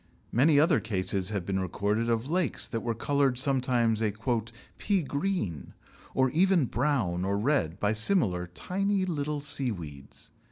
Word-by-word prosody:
Many 140 +4 +4
other 155 0 +4
cases 95 -3 -1
have 100 -5 -3
been 95 0 -1
recorded 105 +5 -1
of 115 +2 0
lakes 175 +2 0
that 115 - -3
were 115 -1 -2
coloured 140 +1 +1
sometimes 125 -4 +1
a 110 -2 +1 0.7
"pea 200 -4 +1
green," 140 - -3 0.4
or 130 -1 +3
even 180 -2 +3
brown 120 -10 0
or 100 +1 0
red 105 - 0
by 105 +1 +1
similar 110 - +1
tiny 195 - -1
little 150 -4 -2
seaweeds. 95 - -3
120 Hz, 145 wpm, -28 LUFS, 100-150 Hz, 0.7 s, Many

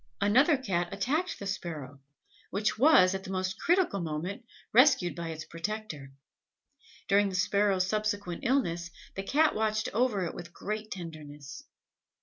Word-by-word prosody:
Another 255 - +4
Cat 175 -9 -2
attacked 295 - -1
the 200 - -7
Sparrow, 155 -8 -5 0.5
which 205 +2 0
was 230 -10 +6
at 190 0 -4
the - - -8
most 185 +1 -2
critical 350 - +2
moment 170 +5 -4 0.3
rescued 255 - +5
by 170 -1 -5
its 155 -1 -6
protector. 165 -6 -5 1.0
During 200 0 +4
the 190 - -5
Sparrows 200 0 +2
subsequent 205 -3 -2
illness, 175 -10 0 0.2
the 195 - -4
Cat 300 +10 +2
watched 215 0 0
over 220 -5 +1
it - - -4
with 170 0 -9
great 215 +1 -4
tenderness. 155 - -9
195 Hz, 140 wpm, -29 LUFS, 170-215 Hz, 1.0 s, was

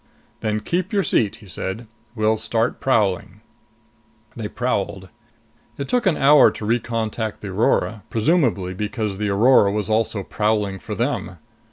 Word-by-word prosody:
"Then 105 0 -1
keep 180 - -2
your 200 -2 +1
seat," 105 - +1
he 105 - -16
said. 95 +6 -5 0.3
"We'll 110 0 +2
start 115 +2 -1
prowling." 105 -4 0 0.9
They 110 -3 -4
prowled. 100 -5 -2 0.7
It 140 - -4
took 245 -4 +1
an 170 - +2
hour 145 +2 +6
to 105 - -7
recontact 115 -1 -2
the 100 - -6
Aurora, 105 +2 +1
presumably 110 - +1
because 105 0 -3
the 105 -1 -1
Aurora 100 0 +5
was 105 0 -2
also 110 -2 0
prowling 105 -2 -1
for 105 - -6
them. 115 -6 -2
110 Hz, 145 wpm, -21 LUFS, 100-120 Hz, 0.9 s, hour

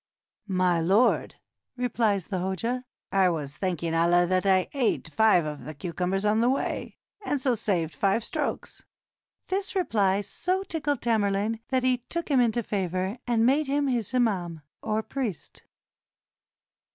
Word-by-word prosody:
"My 185 -3 +2
lord," 195 +9 +2 0.4
replies 220 -6 0
the 185 - -1
Hoja, 230 +8 -2 0.3
"I 190 -2 +4
was 145 -4 -4
thanking 170 -3 -2
Allah 170 +2 +4
that 185 +2 +1
I 185 -1 +3
eat 260 -5 0
five 215 -7 +4
of 150 -1 -5
the 155 - -8
cucumbers 180 +5 -2
on 210 +1 +3
the 235 +2 +3
way, 270 - -2 0.3
and 290 -7 -1
so 260 -1 +1
saved 185 -8 -1
five 200 +3 +1
strokes." - - -4 0.7
This 390 +2 -1
reply 205 - +2
so 365 - -2
tickled 295 -7 -2
Tamerlane 215 -1 +1
that 260 -1 0
he 255 -1 +2
took 335 +8 -5
him 270 - +4
into 235 0 +1
favor, 190 +2 -2
and 230 -2 +2
made 280 +4 +3
him 285 +1 +1
his 235 -5 -1
imam, 180 -10 0 0.2
or 220 0 -1
priest. 235 - -5
210 Hz, 150 wpm, -27 LUFS, 185-250 Hz, 0.7 s, I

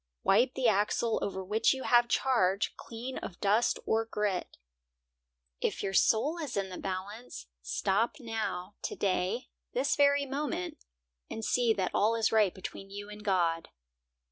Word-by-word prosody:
Wipe 240 +6 +4
the 260 -2 +2
axle 215 +2 +2
over 190 -1 -3
which 215 +7 +3
you 265 - -6
have 240 -1 +5
charge, 215 -6 +2
clean 240 +3 -6
of 180 - -8
dust 210 +4 +2
or 225 +1 +2
grit. 210 -4 -2 1.0
If - - -1
your 195 - -2
soul 290 - +3
is 290 -9 -4
in 195 -1 -1
the 185 - -7
balance, 195 - -5 0.2
stop 195 - 0
now, 220 -6 -3
today, 195 +6 -1 0.2
this - - +1
very 285 0 +4
moment, 275 -9 -3 0.5
and 225 - -5
see 245 -2 +3
that 190 -4 -1
all 220 +3 +3
is 225 -1 +2
right 215 -4 +4
between 195 +1 -8
you 205 +1 -7
and 210 0 -10
God. 170 -5 +1
215 Hz, 150 wpm, -30 LUFS, 195-240 Hz, 1.0 s, have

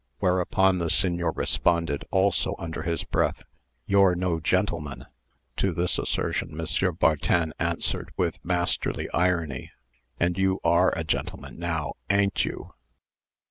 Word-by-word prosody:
Whereupon 95 0 +2
the 85 -1 -1
Signor 85 -3 +1
responded, 85 -5 0
also 95 0 +2
under 80 -1 -5
his 85 -1 -2
breath, - - 0 0.4
"You're 95 -2 +4
no 90 -2 0
gentleman." 80 - -1 0.5
To 95 - +1
this 85 +2 0
assertion, 75 - -2
M. 85 +2 0
Bartin 80 0 +2
answered, - - -1
with - - -1
masterly 90 0 -1
irony, 85 -7 0 0.5
"And 85 +2 +1
you 95 0 +2
are 85 0 +4
a - - -1
gentleman, - - -3
now, 80 -4 -2 0.2
a'n't 100 -1 +2
you?" - - -5
85 Hz, 125 wpm, -26 LUFS, 85-95 Hz, 0.5 s, You're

